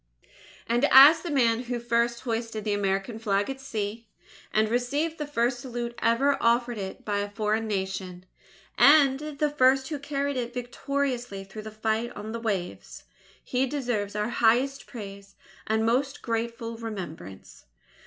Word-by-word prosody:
And 240 +4 +2
as 290 +5 +9
the 350 - -5
man 245 -4 +2
who 245 0 -3
first 235 0 0
hoisted 225 -3 -3
the 210 -1 0
American 200 +2 -1
Flag 205 +1 0
at 270 - -8
sea, 225 -3 -4 0.4
and 215 0 +2
received 285 +8 -1
the 300 - -3
first 245 -3 0
salute 240 -1 -5
ever 270 +5 +2
offered 235 0 +2
it 190 -1 -7
by 205 -1 0
a 205 0 -3
foreign 215 +1 -1
Nation, 190 -3 -4 0.5
and 280 -2 +6
the 300 0 -2
first 265 -1 +3
who 300 -3 -3
carried 280 -1 -2
it 245 0 -4
victoriously 245 -3 -3
through 195 +3 -9
the 215 - -8
fight 220 +2 -2
on 210 +1 -7
the 230 - -4
waves, 200 -6 -4 0.4
he 260 +1 0
deserves 240 -8 -2
our 210 +2 -1
highest 240 +4 +2
praise 200 -4 -9 0.3
and 220 +1 +1
most 260 +4 0
grateful 230 0 -3
remembrance. 185 - -8
235 Hz, 155 wpm, -27 LUFS, 215-265 Hz, 0.5 s, as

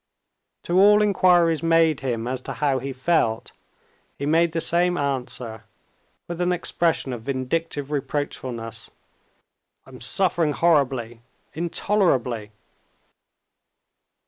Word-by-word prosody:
To 175 +2 +1
all 210 +2 +6
inquiries 175 -6 +3
made 165 -2 +3
him 120 -4 -3
as 130 0 -3
to - - -6
how 140 -3 0
he 135 +2 -5
felt, 130 -4 0 0.7
he 140 - -4
made 165 +3 +3
the 165 - -2
same 175 +2 +2
answer 125 -6 -3 0.6
with 175 0 -5
an 175 0 +1
expression 170 -5 0
of 120 - -6
vindictive 140 +3 -3
reproachfulness, 130 -5 -4 1.0
"I'm - - -13
suffering 170 -5 +2
horribly, 135 -8 +1 0.3
intolerably!" 155 - 0
145 Hz, 105 wpm, -23 LUFS, 130-170 Hz, 1.0 s, all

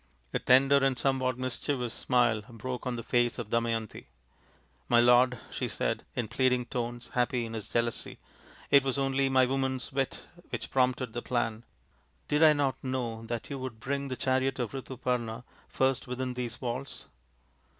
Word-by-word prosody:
A - - +1
tender 135 +2 +5
and 135 -2 +2
somewhat 130 -2 +1
mischievous 130 -1 -2
smile 120 -4 +2
broke 125 +2 -5
on 125 - -1
the 115 - -5
face 120 0 +1
of 115 -4 -6
Damayanti. 115 -2 -1 0.4
" - - -35
My 120 - +6
lord," 125 +1 +5
she - - -2
said, - - -2
in 120 - -1
pleading 125 +1 +2
tones, 120 0 -4
happy 125 -1 +1
in 115 - -7
his 110 -1 -6
jealousy, 115 -1 -2 0.3
" - - -22
it 140 -1 +7
was 135 0 -1
only 135 0 +1
my 130 -1 +5
woman's 130 0 -1
wit 135 -1 -1 0.3
which - - -5
prompted 130 -2 +1
the 120 - -3
plan. 115 -2 -2 0.6
Did 150 +1 +1
I 155 -1 +8
not 140 -2 -1
know 120 -4 -3
that 120 +2 -4
you 140 - -3
would 130 -4 -6
bring 140 +3 -2
the 130 -2 -4
chariot 130 0 +1
of 120 -4 -2
Ritu 130 -2 -7
parna 120 -2 -2 0.3
first 130 -1 +1
within 125 0 -3
these 125 -1 -4
walls 125 +2 -5
125 Hz, 175 wpm, -30 LUFS, 120-130 Hz, 0.6 s, I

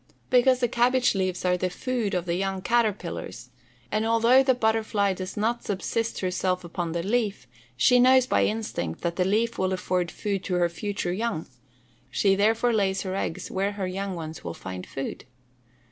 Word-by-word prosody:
_ - - -28 0.2
Because 255 0 +4
the 245 - +3
cabbage 250 +2 +3
leaves 185 -2 -1
are 180 0 +3
the 185 +1 -1
food 230 0 -2
of 180 -1 -1
the 170 - -1
young 190 +1 -2
caterpillars; 200 - -1 0.4
and 215 - +1
although 230 +3 +5
the 260 -1 +3
butterfly 220 -3 +1
does 185 +1 -6
not 230 +3 0
subsist 225 +3 -2
herself 185 0 -1
upon 170 -1 -4
the 170 0 -2
leaf, 210 - -1 0.3
she 250 - +5
knows 255 0 +6
by - - +2
instinct 210 - -3
that 170 0 -2
the 180 - +2
leaf 220 +4 +1
will 190 0 +1
afford 180 -1 -1
food 200 -1 -3
to 185 - -1
her 175 -1 +2
future 180 0 -3
young; 215 -4 -2 0.6
she 195 -1 +2
therefore 225 +4 +2
lays 195 -3 +1
her 190 -1 -3
eggs 180 - -3
where 195 +2 -1
her 200 -2 -3
young 190 +1 -3
ones 160 -2 -7
will 85 -1 -5
find 95 -1 -7
food. 135 - -6
195 Hz, 185 wpm, -26 LUFS, 180-230 Hz, 0.6 s, knows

